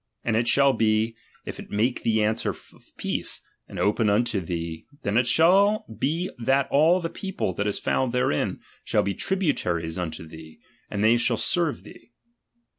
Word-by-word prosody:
And 110 - 0
it 115 +1 +1
shall 140 +1 +4
be, 110 0 +1 0.3
if - - -7
it - - -9
make 115 +5 0
thee 110 -1 +2
answer 110 +1 0
of - - -8 0.3
peace, - - -3 0.3
and - - -9
open 105 +1 +2
unto 105 0 +1
thee, 85 -1 -5 0.2
then 100 - -1
it 120 +1 +3
shall 195 +8 +4
be 165 +8 -1
that 135 +3 +2
all 160 +6 +5
the 165 - -1
people 190 - -3
that 100 +4 -2
is 105 - 0
found 130 -2 0
therein, 125 -11 0 0.2
shall - - +1
be 100 - -1
tributaries 90 - -1
unto 80 -2 -5
thee, 80 0 -12 0.3
and 105 0 -2
they 115 +2 +5
shall 120 0 +1
serve 170 +2 0
thee. 235 - -15
115 Hz, 175 wpm, -25 LUFS, 100-140 Hz, 0.3 s, all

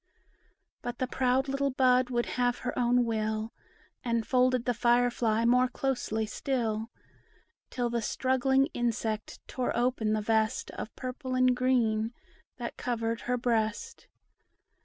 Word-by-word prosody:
But 240 0 -5
the 255 - 0
proud 255 +1 +1
little 275 +1 0
bud 255 -1 +3
would 240 -1 0
have 245 -1 0
her 245 - -2
own 245 0 +3
will, 220 0 -2 0.5
And 235 -2 0
folded 255 -1 +2
the 245 - +1
fire 240 +1 +3
fly 230 -1 +1
more 250 +2 +4
closely 245 -4 -2
still; 225 -1 -2 0.8
Till 245 -2 -2
the 235 0 0
struggling 260 +3 +2
insect 225 -2 -3
tore 255 -2 -2
open 240 -3 +1
the 215 - 0
vest 220 +2 0
Of 215 - -7
purple 255 0 -4
and 255 0 +4
green, 235 -3 +1 0.4
that - - -6
covered 230 -2 -2
her 250 0 -1
breast. 235 - -1
245 Hz, 135 wpm, -29 LUFS, 225-255 Hz, 0.8 s, more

